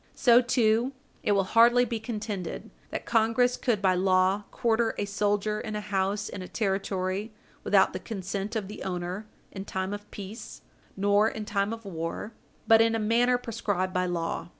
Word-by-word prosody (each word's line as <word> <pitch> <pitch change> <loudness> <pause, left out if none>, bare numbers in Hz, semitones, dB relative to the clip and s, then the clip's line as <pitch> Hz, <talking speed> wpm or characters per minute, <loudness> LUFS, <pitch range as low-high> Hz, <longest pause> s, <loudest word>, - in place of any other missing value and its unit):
So, 240 -2 +6
too, 240 +1 +2 0.3
it 205 - +2
will 195 -1 +3
hardly 235 +5 +5
be 230 -1 -3
contended 210 -5 -5 0.2
that - - -5
Congress 235 +2 +2
could 220 -6 -1
by 185 -1 +4
law 185 +2 +2
quarter 230 -1 +1
a - - -1
soldier 205 +1 0
in 215 -1 -5
a - - -1
house 200 0 -1
in 190 - -7
a 185 - -7
Territory 195 0 -2 0.3
without 195 -2 +4
the 185 - -4
consent 195 +1 -4
of 210 -3 -2
the 210 - -9
owner, 180 +3 -4 0.2
in 195 - -6
time 190 0 -3
of 205 0 -8
peace 205 +3 -9 0.3
nor 205 +2 +3
in 220 -2 -6
time 200 0 0
of 225 -1 -7
war, 170 +4 -5 0.3
but 225 0 +7
in 225 0 +3
a - - 0
manner 240 +3 +3
prescribed 205 -6 -2
by 180 -1 +1
law. 170 -1 -3
205 Hz, 175 wpm, -27 LUFS, 190-225 Hz, 0.3 s, but